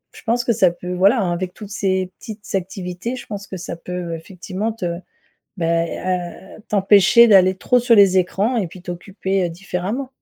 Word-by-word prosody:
je -, -, -13 dB
pense 240 Hz, +1 st, 0 dB
que 235 Hz, -, +1 dB
ça 190 Hz, -5 st, +3 dB
peut 180 Hz, +1 st, -7 dB
voilà, 195 Hz, +6 st, +3 dB
avec 180 Hz, +1 st, -3 dB
toutes 210 Hz, -2 st, -10 dB
ces 190 Hz, -3 st, -1 dB
petites 215 Hz, -2 st, -10 dB
activités, 185 Hz, +4 st, -4 dB
je 250 Hz, -, -10 dB
pense 205 Hz, -2 st, -6 dB
que 190 Hz, -, -7 dB
ça 175 Hz, -1 st, -6 dB
peut 175 Hz, 0 st, -5 dB
effectivement 190 Hz, +5 st, -5 dB
te 175 Hz, -5 st, -4 dB, 0.6 s
bah, 165 Hz, 0 st, +1 dB
heu, 185 Hz, +3 st, -5 dB
t'empêcher 205 Hz, +3 st, +6 dB
d'aller 190 Hz, -3 st, +6 dB
trop 250 Hz, +6 st, +2 dB
sur 240 Hz, -1 st, +4 dB
les 195 Hz, -3 st, +6 dB
écrans 200 Hz, +7 st, 0 dB
et 205 Hz, -, 0 dB
puis 175 Hz, +2 st, -12 dB
t'occuper 190 Hz, +1 st, -2 dB
différemment. 195 Hz, +8 st, -4 dB
190 Hz, 175 wpm, -20 LUFS, 180-215 Hz, 0.6 s, t'empêcher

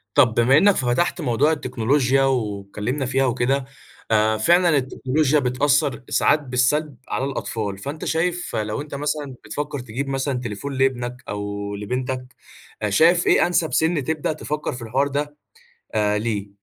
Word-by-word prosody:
طب 125 Hz, -6 st, +5 dB
بما 125 Hz, +5 st, +4 dB
إنك 200 Hz, +3 st, +5 dB
فتحت 125 Hz, +7 st, 0 dB
موضوع 140 Hz, +4 st, +2 dB
التكنولوجيا، 135 Hz, -1 st, +1 dB
واتكلمنا 110 Hz, +1 st, -2 dB
فيها 135 Hz, +2 st, +1 dB
وكده 130 Hz, +2 st, 0 dB, 0.5 s
آآ، 110 Hz, 0 st, +3 dB
فعلًا 175 Hz, +9 st, +4 dB
التكنولوجيا 135 Hz, +3 st, +1 dB
بتأثر 135 Hz, +1 st, +1 dB
ساعات 155 Hz, -, +3 dB
بالسلب 135 Hz, +3 st, 0 dB
على 135 Hz, -, -2 dB
الأطفال، 110 Hz, -7 st, -3 dB
فأنت 140 Hz, +9 st, -6 dB
شايف 175 Hz, +2 st, -1 dB
لو 110 Hz, +5 st, -2 dB
أنت 145 Hz, -1 st, -7 dB
مثلًا 145 Hz, -2 st, -3 dB
بتفكر 145 Hz, -1 st, -4 dB
تجيب 125 Hz, +4 st, -5 dB
مثلًا 135 Hz, -1 st, -1 dB
تليفون 120 Hz, +4 st, -5 dB
لإبنك 125 Hz, -1 st, -1 dB
أو 100 Hz, 0 st, -4 dB
لبنتك، 125 Hz, +4 st, -3 dB, 0.6 s
شايف 170 Hz, -, +4 dB
إيه -, -, +5 dB
أنسب 170 Hz, -2 st, 0 dB
سن 160 Hz, -3 st, +2 dB
تبدأ 155 Hz, +1 st, -1 dB
تفكر 150 Hz, -2 st, -4 dB
في 125 Hz, -, -8 dB
الحوار 130 Hz, +5 st, 0 dB
ده 145 Hz, +1 st, -3 dB, 0.6 s
آآ، 105 Hz, -1 st, +2 dB
ليه؟ 105 Hz, -2 st, -2 dB
130 Hz, 145 wpm, -22 LUFS, 115-145 Hz, 0.6 s, طب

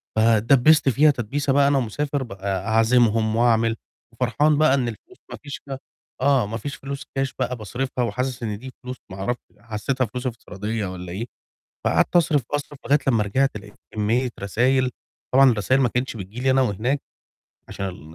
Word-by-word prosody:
فاتدبّست 120 Hz, +7 st, +5 dB
فيها 150 Hz, +5 st, +5 dB
تدبيسة 135 Hz, +3 st, -1 dB
بقى، 140 Hz, 0 st, +4 dB
أنا 140 Hz, 0 st, +3 dB
ومسافر 135 Hz, +3 st, -1 dB
بقى 100 Hz, -2 st, -4 dB
أعزمهم 110 Hz, -1 st, +3 dB
وأعمل، 115 Hz, -1 st, +3 dB, 0.4 s
وفرحان 135 Hz, +6 st, +2 dB
بقى 155 Hz, -2 st, +4 dB
إن 130 Hz, -3 st, +1 dB
الفلوس 360 Hz, -, -9 dB
ما -, -, -6 dB
فيش 145 Hz, -4 st, -7 dB
ف 140 Hz, -, -9 dB, 0.5 s
آه، 135 Hz, -3 st, +3 dB
ما 115 Hz, -, -4 dB
فيش 140 Hz, +3 st, -5 dB
فلوس 140 Hz, 0 st, -7 dB
كاش 135 Hz, 0 st, -1 dB
بقى 125 Hz, 0 st, -1 dB
باصرِفها 125 Hz, +4 st, -3 dB
وحاسس 125 Hz, +1 st, -2 dB
إن 105 Hz, -2 st, -3 dB
دي 130 Hz, +4 st, -9 dB
فلوس 125 Hz, 0 st, -6 dB
ما 95 Hz, -, -7 dB
أعرفش 120 Hz, +5 st, -2 dB, 0.2 s
حسيتها 115 Hz, +5 st, -2 dB
فلوس 125 Hz, +4 st, -5 dB
افتراضية 110 Hz, -2 st, -4 dB
والّا 90 Hz, -1 st, -7 dB
إيه، 105 Hz, +6 st, -4 dB, 0.6 s
فقعدت -, -, +2 dB
أصرِف، 155 Hz, -4 st, +4 dB
أصرِف 145 Hz, 0 st, -3 dB
لغاية 145 Hz, +1 st, +4 dB
لمّا 115 Hz, -5 st, +3 dB
رِجِعت 130 Hz, +4 st, +1 dB
لقيت 105 Hz, 0 st, -13 dB, 0.2 s
كمية 115 Hz, +4 st, +1 dB
رسايل، 125 Hz, +6 st, +2 dB, 0.4 s
طبعًا 135 Hz, -1 st, +7 dB
الرسايل 125 Hz, +5 st, +2 dB
ما 125 Hz, -, +3 dB
كانتش 125 Hz, 0 st, -2 dB
بتيجي 100 Hz, +4 st, -8 dB
لي 130 Hz, 0 st, +3 dB
أنا 135 Hz, 0 st, +4 dB
وهناك 125 Hz, +5 st, 0 dB, 0.7 s
عشان 90 Hz, -5 st, -7 dB
125 Hz, 170 wpm, -23 LUFS, 110-135 Hz, 0.7 s, طبعًا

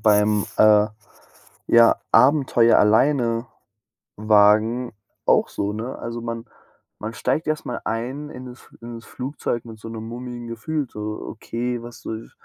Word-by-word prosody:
beim, 105 Hz, -1 st, +3 dB
äh, 105 Hz, -1 st, +6 dB, 0.8 s
ja 115 Hz, 0 st, +6 dB, 0.2 s
Abenteuer 130 Hz, -5 st, +5 dB
alleine 115 Hz, +1 st, +3 dB, 0.7 s
wagen 110 Hz, +3 st, +3 dB, 0.3 s
auch -, -, +3 dB
so, 100 Hz, +1 st, -3 dB
ne? 115 Hz, +4 st, -5 dB
Also, 115 Hz, 0 st, -5 dB
man 115 Hz, 0 st, -5 dB, 0.5 s
man 110 Hz, +2 st, -5 dB
steigt 130 Hz, +8 st, -1 dB
erst 155 Hz, 0 st, -2 dB
mal 120 Hz, -, -4 dB
ein 130 Hz, +6 st, -3 dB
in 130 Hz, -2 st, -9 dB
das 125 Hz, +1 st, -11 dB
F -, -, -20 dB
in 120 Hz, 0 st, -8 dB
das 115 Hz, -, -11 dB
Flugzeug 125 Hz, -3 st, -4 dB
mit 110 Hz, -2 st, -11 dB
so 115 Hz, -, -9 dB
'nem 110 Hz, 0 st, -7 dB
mulmigen 120 Hz, 0 st, -7 dB
Gefühl, 130 Hz, +5 st, -3 dB
so: 105 Hz, 0 st, -5 dB
„Okay, 120 Hz, +2 st, -4 dB
was 120 Hz, 0 st, -11 dB
soll 110 Hz, 0 st, -7 dB
115 Hz, 150 wpm, -22 LUFS, 110-125 Hz, 0.8 s, äh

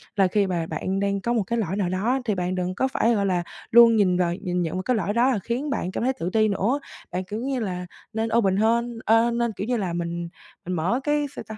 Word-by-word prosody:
là 195 Hz, -2 st, +4 dB
khi 200 Hz, +2 st, +1 dB
mà 175 Hz, -3 st, -1 dB
bạn 185 Hz, +5 st, -2 dB
đang 200 Hz, 0 st, 0 dB
có 235 Hz, +4 st, 0 dB
một 225 Hz, -4 st, +1 dB
cái 235 Hz, +4 st, -2 dB
lỗi 190 Hz, -4 st, -1 dB
nào 190 Hz, -4 st, 0 dB
đó 215 Hz, +9 st, 0 dB
thì 215 Hz, -4 st, 0 dB
bạn 180 Hz, 0 st, -2 dB
đừng 180 Hz, 0 st, -2 dB
có 265 Hz, -, +1 dB
phải, 235 Hz, -3 st, +1 dB
gọi 200 Hz, -1 st, +1 dB
là, 180 Hz, -3 st, +1 dB, 0.3 s
luôn 235 Hz, -1 st, +8 dB
nhìn 190 Hz, -4 st, +3 dB
vào 175 Hz, -1 st, +1 dB
nhìn 180 Hz, -2 st, -2 dB
nhận 165 Hz, -2 st, -2 dB
vào 185 Hz, -, -3 dB
cái 250 Hz, -, +1 dB
lỗi 205 Hz, -1 st, -1 dB
đó 240 Hz, +3 st, +3 dB
rồi 220 Hz, -, 0 dB
khiến 250 Hz, +6 st, -2 dB
bạn 185 Hz, -9 st, -2 dB
cảm -, -, -3 dB
thấy 260 Hz, +2 st, +2 dB
tự 175 Hz, -8 st, -4 dB
ti 220 Hz, -1 st, +4 dB
nữa. 215 Hz, +7 st, 0 dB, 0.3 s
Bạn, 180 Hz, +1 st, -2 dB
kiểu 205 Hz, +4 st, -5 dB
như 265 Hz, +1 st, -2 dB
là, 180 Hz, -5 st, -3 dB, 0.3 s
nên 225 Hz, +1 st, -1 dB
open 195 Hz, -4 st, +2 dB
hơn, 230 Hz, +2 st, +1 dB
ơ, 225 Hz, +2 st, +4 dB
nên 235 Hz, 0 st, 0 dB
kiểu 200 Hz, -, -5 dB
như 245 Hz, 0 st, +1 dB
là 185 Hz, -5 st, -2 dB
mình 170 Hz, 0 st, -3 dB, 0.4 s
mình 180 Hz, -, -3 dB
mở 180 Hz, +10 st, 0 dB
cái 295 Hz, 0 st, +1 dB
sao -, -, -6 dB
ta? 220 Hz, -, -7 dB
205 Hz, 275 wpm, -24 LUFS, 180-235 Hz, 0.4 s, luôn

